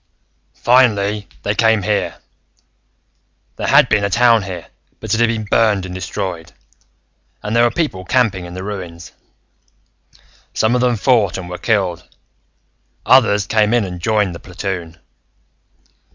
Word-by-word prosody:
"... - - -45
finally, 105 -5 +2 0.2
they - - 0
came 110 -3 +2
here. 105 +1 -1 1.4
There - - -3
had - - +5
been 105 - +1
a 100 - 0
town 115 +2 +4
here, 90 -5 -7 0.3
but 110 -1 -3
it 110 - +1
had 120 - +4
been 115 -2 -2
burned 105 -2 +2
and 90 - -7
destroyed, 90 -2 -5 0.9
and 105 +2 -3
there 120 - +4
were 120 - +4
people 120 - -3
camping 100 -4 0
in 85 0 -9
the 95 - -6
ruins. 90 -4 -7 1.4
"Some 110 +2 +2
of 125 - +1
them 125 -1 +2
fought 110 -4 +2
and 95 -2 -7
were 90 0 -7
killed, 95 -7 -1 1.0
others 110 -6 +4
came 110 +1 +2
in 120 -4 +1
and 90 -2 -7
joined 105 -1 +1
the 85 - -9
platoon. 90 -3 -6
105 Hz, 150 wpm, -17 LUFS, 90-115 Hz, 1.4 s, had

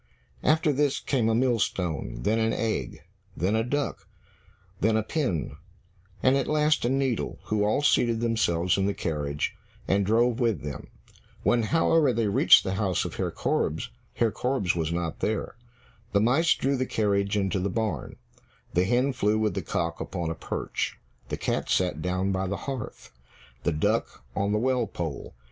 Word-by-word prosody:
After 155 -1 +3
this 140 0 +1
came 120 -5 0
a 110 - +2
millstone, 105 - 0
then 110 +3 +2
an 115 0 +1
egg, 115 -1 -2 0.3
then 95 +6 +1
a 110 - +2
duck, 145 +4 -2 0.7
then 110 +2 +3
a 110 - +1
pin, 115 - -2 0.7
and 130 +1 +5
at 135 - 0
last 150 0 +2
a 120 - +2
needle, 135 -3 0
who 105 -1 0
all 110 +7 +1
seated 115 -5 +3
themselves 100 -7 +1
in 95 - +2
the 100 - -1
carriage, 75 -3 -2 0.3
and 100 +1 +2
drove 115 +4 +2
with 115 - +1
them. 75 -2 -6 0.6
When, 120 - +3
however, 160 +3 +3
they 115 0 0
reached 100 - +6
the 95 - -2
house 95 -4 0
of - - -6
Herr - - 0
Korbes, - - -1 0.2
Herr 115 -2 +2
Korbes 125 -9 0
was 80 -1 -1
not 85 -1 -3
there. 110 -1 -2 0.6
The 100 - +4
mice 130 +10 +3
drew 135 +1 0
the 130 0 -1
carriage 100 -1 +1
into 95 -1 0
the 95 +2 -1
barn, 95 - -2 0.6
the 90 +1 +3
hen 125 +6 +2
flew 110 -4 +1
with 110 -3 +1
the - - -2
cock 85 -1 -2
upon 85 -3 -3
a - - -1
perch. - - -3 0.3
The - - -2
cat - - -2
sat 90 -1 +1
down 90 +2 0
by 95 0 -1
the 100 +1 -2
hearth, 135 - -6 0.5
the - - +1
duck 75 -4 -1
on 100 +1 0
the 105 - +2
well 125 0 +1
pole. 80 -6 -5
110 Hz, 175 wpm, -27 LUFS, 95-125 Hz, 0.7 s, reached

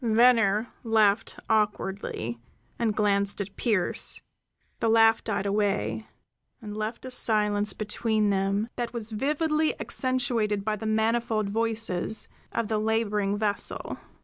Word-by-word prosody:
Venner 225 -2 +4
laughed 215 -3 +2
awkwardly, 200 - -1 0.4
and 225 -3 0
glanced 200 -1 +1
at 200 0 -5
Pearse; 210 -7 +2 0.6
the 230 - +1
laugh 225 0 +5
died 200 -2 -2
away 195 - 0 0.5
and 210 -2 -8
left 215 +3 -4
a 255 - -6
silence 210 -4 +1
between 215 0 0
them 195 +2 0
that 240 -1 -3
was 225 -2 -5
vividly 305 +6 0
accentuated 240 -6 0
by 215 -1 0
the 220 +1 -5
manifold 220 -1 +1
voices 225 -2 -1 0.2
of 230 -2 -1
the 215 -1 0
laboring 210 -2 0
vessel. 205 -1 -2
215 Hz, 120 wpm, -27 LUFS, 205-230 Hz, 0.6 s, laugh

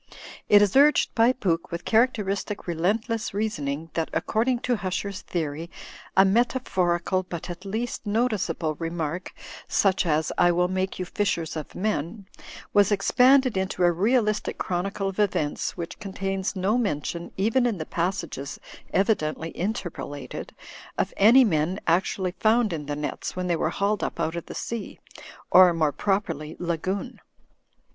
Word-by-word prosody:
It 205 0 +8
is 205 +2 0
urged 290 +2 +5
by 230 +2 +5
Pooke, 175 -10 -1
with 170 +1 -5
cha: 220 - +2
acteristic 210 -4 0
relentless 205 +6 -1
reasoning, 160 -7 -2
that 165 -1 -1
according 240 +3 0
to 245 -2 0
Hu 190 -2 -3
cher's 195 +1 -3
theory 160 -1 -4 0.5
a 190 - +8
metaphorical 190 -5 +1
but 175 -1 -6
at 175 +3 -9
least 225 +3 -4
noticeable 205 -8 0
reii 165 -1 -3
mark, 170 +1 -3 0.4
such 190 -2 +2
as, 155 0 +1
'I 175 0 +5
will 180 +1 +2
make 190 0 -2
you 185 - -3
fishers 175 -5 -1
of 155 -2 -6
men/ 200 0 -2 0.5
waftc 205 0 +4
expanded 255 +5 +4
into 190 -1 -1
a 175 - +5
realistic 210 +4 +1
chronicle 195 +2 -2
of 195 - -7
events 170 -8 0
whicWtei 170 -1 -6
contains 195 0 -3
no 195 +6 +1
mention, 170 -4 -2
even 230 +6 +2
in 225 -5 -1
the 155 - -4
passages 170 -6 -3 0.3
evidentlyill 165 -5 0
interpolated, 175 - -5 0.4
of - - -1
any 235 +6 +7
men 175 -2 +1
actually 185 +2 +1
found 220 -2 +3
in 150 -3 -5
the 145 - -2
nets'.\ 150 0 -4
when 185 0 -2
they 175 -1 +1
were 160 - 0
hauled 200 +4 0
up - - -3
out 160 - -1
of 170 - -6
the - - -8
sea; 230 -3 -5 0.5
or, 185 -1 +8
moreti 155 -3 0
properly, 195 -7 -1
lagoon. 175 +3 -3
190 Hz, 155 wpm, -25 LUFS, 170-210 Hz, 0.5 s, It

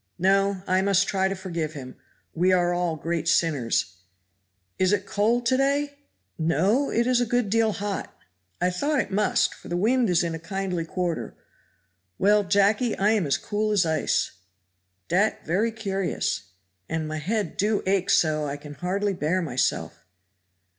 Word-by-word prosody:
"No! 195 +1 +2
I 185 +1 +2
must 195 -1 +2
try 190 -1 +1
to 195 - -2
forgive 170 -5 -4
him; 130 -4 -9 0.4
we 180 +3 +2
are 175 -1 +3
all 175 -2 -1
great 165 +1 -3
sinners; 145 - +1 0.8
is 185 0 +3
it 200 -1 0
cold 225 +5 +1
to 255 +2 +3
day?" 285 +1 +1 0.4
"No! 185 - +2
it 235 +1 +1
is 250 -1 +2
a - - +2
good 245 -3 0
deal 225 0 +3
hot 205 -1 -4 0.5
"I 180 - +1
thought 285 +10 0
it - - -2
must, 210 +2 +2
for - - -14
the 175 - -2
wind 235 +4 +2
is 175 -1 +3
in 170 -1 -2
a 165 - -5
kindly 180 0 -3
quarter. 175 -1 -3 0.8
Well, 205 +1 +4
Jacky, 205 +4 +2
I 205 +2 +3
am 210 -8 +1
as 140 0 +2
cool 215 +4 -2
as 200 -4 +3
ice." 160 -1 0 0.8
"Dat 200 +5 +1
very 205 +8 +1
curious." 195 - -2 0.4
"And 160 -1 -2
my 155 0 -4
head 200 +2 -2
do 210 +1 0
ache 190 0 +1
so 155 -2 +2
I 140 +1 -4
can 145 0 -10
hardly 195 +7 -1
bear 175 +1 0
myself." 130 -8 -2
190 Hz, 165 wpm, -25 LUFS, 165-210 Hz, 0.8 s, Well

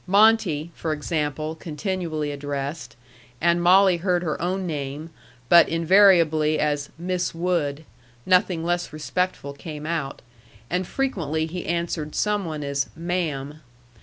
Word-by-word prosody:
"Monte," 195 -6 +3
for 160 -2 -3
example, 155 0 -2
continually 160 -1 -3
addressed, 145 +1 -5 0.4
and 170 +1 +2
Molly 185 +1 +5
heard 180 0 0
her 155 -3 -3
own 185 +2 -1
name, 150 0 -5 0.4
but 170 +4 +7
invariably 165 -3 +4
as 145 -1 -1
"Miss 180 0 -2
Wood"; 165 -4 -1 0.4
nothing 180 -3 +2
less 175 0 -1
respectful 155 0 -2
came 150 +1 -8
out, 155 -4 -3 0.5
and 180 0 -1
frequently 160 - -1
he 175 +2 -6
answered 170 -2 -2
some 210 -2 0
one 155 -2 -4
as 140 0 -1
"ma'am." 155 -4 -3
165 Hz, 125 wpm, -24 LUFS, 150-180 Hz, 0.5 s, but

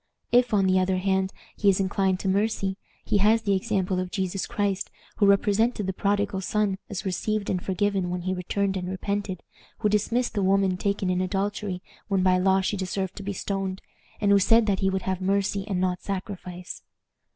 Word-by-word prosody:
If, 245 0 +4
on 200 -3 +3
the 185 0 +4
other 185 0 +1
hand, 190 0 +1 0.2
he 205 - +3
is 195 - +3
inclined 190 -1 +1
to - - -3
mercy, 195 0 +1 0.3
he 210 - +2
has 220 +3 +4
the 200 - +2
example 185 -1 0
of 185 0 -3
Jesus 190 0 -2
Christ, 205 -4 -1 0.3
who 205 - +4
represented 205 +2 +3
the 190 - -2
prodigal 200 0 0
son 200 0 0
as 200 0 -5
received 205 +2 -1
and 180 -1 -2
forgiven 195 -1 0
when 180 0 -2
he 185 +1 -1
returned 195 +2 -1
and 180 -1 -4
repented, 190 -1 -3 0.3
who 210 - +1
dismissed 230 +4 +1
the 205 - 0
woman 195 -1 +3
taken 195 0 -1
in 180 0 +1
adultery, 195 0 -2 0.2
when 195 -3 +1
by 185 -1 +4
the 180 - -1
law 190 0 +4
she 190 - -1
deserved 190 0 -3
to - - -5
be 200 +1 -3
stoned, 195 0 -3 0.4
and 205 -2 +2
who 200 - +6
said 225 +4 +5
that 200 -3 +1
he 190 - +2
would 190 0 -2
have 190 -1 -2
mercy 195 +1 0
and 190 -4 -1
not 180 -1 0
sacrifice." 185 -2 -6
195 Hz, 200 wpm, -26 LUFS, 185-205 Hz, 0.4 s, who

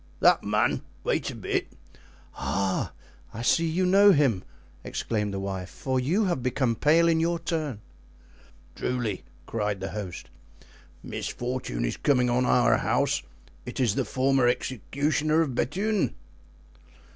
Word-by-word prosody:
"That - - +5
man—wait - - -1
a - - -6
bit." - - -2 0.6
"Ah! 95 -1 -1 0.4
I 115 - -4
see 165 +7 +3
you 175 +3 +1
know 200 +2 +7
him," 130 - +2 0.4
exclaimed 105 -3 -2
the 100 - -3
wife; 95 -2 -4
"for 130 -1 -2
you 175 +12 +1
have 175 -8 0
become 125 -1 +1
pale 160 +7 +4
in 165 -1 +3
your 170 +1 +1
turn." 155 -9 -3 0.9
"Truly," 120 -6 -2 0.2
cried 105 -3 -2
the 95 - -4
host, 100 -5 -6 0.7
"misfortune 120 - -3
is - - -2
coming 125 -4 +2
on 125 +1 +2
our 125 - +4
house; - - +1 0.4
it - - -7
is 120 -6 +2
the - - 0
former 130 -1 +2
executioner 145 +6 0
of 145 -6 -1
Bethune." 195 - 0
130 Hz, 135 wpm, -27 LUFS, 110-160 Hz, 0.9 s, know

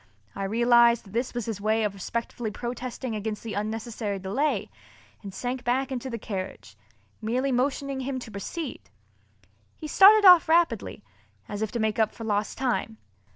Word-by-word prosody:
I 195 - -3
realized 235 +2 +4
that 195 - -14
this 240 +2 -2
was 240 -3 -2
his 215 -3 -4
way 220 +1 +1
of 210 -2 -1
respectfully 230 +3 -4
protesting 245 +1 -5
against 210 0 -4
the 225 -2 -5
unnecessary 215 0 -3
delay 205 +11 -1 0.5
and 200 - -8
sank 245 +5 -4
back 260 +2 0
in 260 - -2
the 245 -1 -5
carriage, 195 -3 -6 0.5
merely 250 +5 0
motioning 270 +2 -1
him 265 0 -3
to 245 -3 -8
proceed. 250 - -6 0.9
He 310 - -7
started 410 +6 +7
off 360 -3 +8
rapidly, 325 -10 +1 0.4
as 205 - -5
if 220 - -2
to 235 - -2
make 220 0 0
up 220 -1 +1
for 230 - -8
lost 210 -1 -1
time. 240 -4 -1
235 Hz, 165 wpm, -26 LUFS, 215-260 Hz, 0.9 s, off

